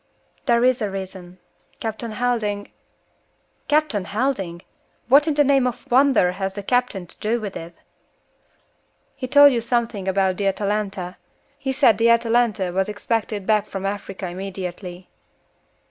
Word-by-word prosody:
"There 235 -1 +4
is 255 -1 +3
a 210 - 0
reason. 190 -2 -7 0.4
Captain 225 +1 -4
Helding 215 -4 -1 0.5
" - - -43
"Captain 295 -11 +2
Helding! 200 -7 -2 0.4
What 280 +5 +6
in 305 - +1
the 295 - +5
name 270 -2 +3
of 250 +2 -6
wonder 260 -8 +4
has 190 +1 -3
the 205 - -5
captain 245 -5 0
to - - -11
do 225 +3 0
with 205 -3 -6
it?" 170 +1 -8 1.4
"He 265 -2 -5
told 285 +1 +7
you 235 - 0
something 230 -4 -1
about 190 -1 +1
the 200 - 0
Atalanta. 195 -2 -2 0.4
He 270 -1 -2
said 255 -6 +4
the 230 +1 +4
Atalanta 230 -5 +2
was 190 +2 0
expected 210 -1 -2
back 215 -1 +2
from 195 0 -5
Africa 195 -1 -4
immediately." 180 0 -6
210 Hz, 145 wpm, -22 LUFS, 190-245 Hz, 1.4 s, told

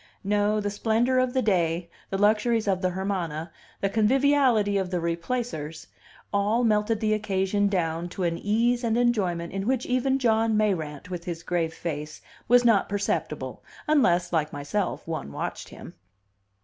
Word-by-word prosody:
No; 205 +1 +1
the 205 -1 -2
splendor 230 +5 +1
of 255 -1 +1
the 260 - +1
day, 170 -4 +1 0.2
the 195 - -2
luxuries 215 +2 +2
of 190 -2 +1
the 185 - +1
Hermana, 175 -4 -3 0.3
the 195 - +1
conviviality 240 -1 +3
of 190 -2 -2
the 180 -1 -1
Replacers 170 -2 -3 0.5
all 210 +4 +2
melted 215 -1 +2
the 215 -1 +1
occasion 205 -1 0
down 170 -3 -1
to 185 - -4
an 170 -1 0
ease 235 +4 +1
and 230 -1 +1
enjoyment 190 -9 0
in 195 +1 -3
which 255 -1 0
even 255 +2 +1
John 225 -3 +2
Mayrant, 180 -7 -1
with 175 -1 -5
his 170 -1 -5
grave 165 -2 -1
face, 155 -2 -5 0.3
was 245 +1 +5
not 220 -5 +4
perceptible, 200 0 -3 0.2
unless, 180 - +2
like 155 -2 +1
myself, 145 +9 -3
one 160 - -4
watched - - -5
him. - - -11
205 Hz, 160 wpm, -26 LUFS, 175-225 Hz, 0.5 s, was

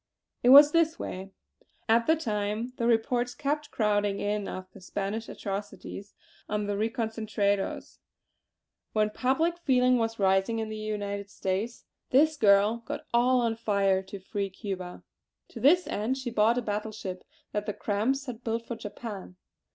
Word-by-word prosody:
"It 245 - +4
was 290 +3 +10
this 330 0 +2
way. 190 +1 -6 0.6
At 230 +1 +3
the 320 - +5
time 215 -3 -2
the 235 - 0
reports 240 +1 +1
kept 295 +1 -2
crowding 205 -2 +1
in 205 0 -1
of 185 - -6
the - - -13
Spanish 205 +4 -4
atrocities 200 0 -6 0.3
on 210 0 -1
the 205 - -1
reconcentrados; 220 -2 -1 0.9
when 215 -1 +2
public 320 +9 +1
feeling 255 -5 +3
was 225 0 -1
rising 195 +3 +2
in 220 -1 -3
the 215 - -5
United 205 -2 -4
States, 200 +4 -3 0.2
this 310 +4 +4
girl 210 -2 +4
got - - -5
all 250 +1 +4
on 230 -1 0
fire 200 -4 +1
to 190 +1 -9
free 195 +1 -3
Cuba. 185 -2 -6 0.5
To - - -9
this 355 +6 +5
end 225 +6 -1
she 255 -3 -4
bought 225 +2 +3
a 245 - 0
battle 210 0 -2
ship 190 -4 -6 0.3
that 210 0 -3
the 210 - -1
Cramp's 235 +7 0
had 245 -3 -7
built 230 0 -2
for 235 - -5
Japan. 205 -4 -8
220 Hz, 160 wpm, -28 LUFS, 200-245 Hz, 0.9 s, was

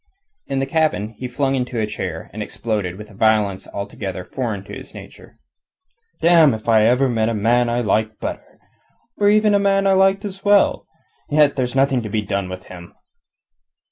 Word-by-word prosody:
In 135 - -2
the 135 - 0
cabin 145 -8 0
he 120 +3 -7
flung 135 +2 -1
into 125 -2 -2
a 110 - +1
chair, 95 -6 -6
and 110 - -6
exploded, 105 -4 -3
with 105 +1 -11
a - - -15
violence 100 -2 +1
altogether 100 -2 -5
foreign 110 -4 -4
to - - -11
his - - -10
nature. - - -13 0.9
"Damme 165 -6 +6
if 110 - -11
ever 115 +4 +4
I - - +2
met 115 -2 0
a 115 - -2
man 120 +3 +2
I 120 +1 0
liked 110 0 0
better, - - -7 0.6
or 205 0 +3
even 210 0 +4
a 200 - +4
man 195 0 +2
I 195 - +4
liked 195 +1 +3
as 195 -1 -7
well. 205 -1 +3 0.4
Yet 150 -1 +3
there's 125 -1 -2
nothing 135 -2 +2
to 110 - -6
be 105 0 -1
done 100 -2 -3
with 95 0 -7
him." 85 -2 -12
120 Hz, 190 wpm, -20 LUFS, 105-145 Hz, 0.9 s, Damme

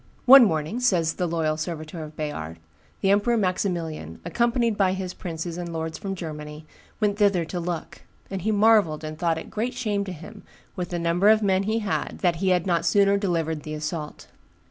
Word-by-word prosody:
"One 265 -1 +10
morning," 160 +4 -1
says 175 -10 +2
the 180 - -2
Loyal 160 -2 0
Serviteur 155 0 -5
of 155 0 -10
Bayard, 85 - -5 0.4
"the 195 - +3
Emperor 210 +4 +3
Maximilian, 170 - -2
accompanied 235 +4 +1
by 190 -2 +2
his 190 -1 -4
princes 170 0 -5
and 175 -1 -5
lords 160 0 -4
from 195 -2 -4
Germany, 150 -2 -7 0.3
went 210 -1 0
thither 195 -5 +3
to 170 +3 -4
look; 170 -1 -5 0.3
and 195 -1 -3
he 220 +5 0
marvelled 205 -7 +3
and 155 0 -6
thought 165 -2 +1
it 160 - -8
great 240 +4 -2
shame 210 -5 -1
to 190 - -5
him, 165 -2 -10 0.3
with 180 -1 -4
the 175 - -3
number 170 +4 +2
of 215 0 +5
men 190 -1 +2
he 220 - +1
had, 195 - -2
that 175 -2 +2
he 190 +2 0
had 180 -2 +2
not 170 -3 +1
sooner 200 +3 +4
delivered 165 -6 -1
the 155 0 -6
assault. 155 0 -5
175 Hz, 195 wpm, -25 LUFS, 160-200 Hz, 0.4 s, One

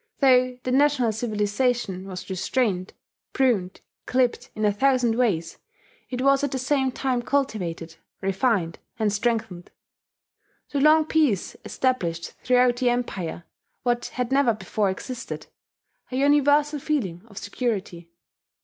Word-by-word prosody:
Though 255 -2 +4
the 255 - -2
national 270 -3 +3
civilization 215 -2 -1
was 185 -1 -7
restrained, 190 0 -1 0.4
pruned, 215 -9 +1 0.3
clipped 250 0 +1
in 215 - -1
a 205 - +3
thousand 255 0 +2
ways, 200 -9 0 0.5
it 255 0 -3
was 275 0 +4
at 285 - +1
the 265 - -1
same 265 0 +1
time 255 -1 -1
cultivated, 180 -12 -2 0.2
refined, 195 -3 0 0.2
and 215 -3 +1
strengthened. 205 -5 -2 1.0
The 280 - 0
long 310 +1 +6
peace 295 - +1
established 170 -11 -1
throughout 250 -1 +3
the 250 -1 +2
Empire 200 -9 -3 0.4
what 240 -1 0
had 250 0 -2
never 270 -4 +3
before 205 0 -1
existed, 245 +6 -6 0.7
a - - -3
universal 290 +2 +3
feeling 225 - -2
of 200 -3 -16
security. 200 -7 -3
245 Hz, 125 wpm, -24 LUFS, 195-265 Hz, 1.0 s, long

